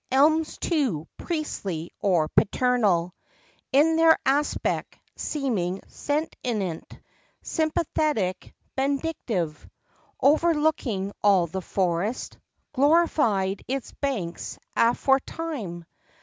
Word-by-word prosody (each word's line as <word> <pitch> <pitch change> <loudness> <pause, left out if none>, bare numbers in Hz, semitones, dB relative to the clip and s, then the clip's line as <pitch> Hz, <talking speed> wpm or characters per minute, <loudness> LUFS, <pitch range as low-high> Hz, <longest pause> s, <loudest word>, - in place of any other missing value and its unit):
Elms, 310 +4 +3
too, 255 - 0
priestly 195 - -4
or 175 -6 +2
paternal 205 -7 +2 0.6
In 315 +4 +4
their 325 0 +6
aspect—seeming 265 - -1
sentient, 240 - -3 0.4
Sympathetic, 305 - -1 0.2
benedictive, 265 - -2 0.5
Overlooking 295 - +2
all 195 -4 +5
the 185 +3 -5
forest— 185 +5 -2 0.3
Glorified 265 - +2
its 270 0 -3
banks 215 -12 -4 0.2
aforetime. 250 - 0
250 Hz, 70 wpm, -25 LUFS, 190-300 Hz, 0.6 s, their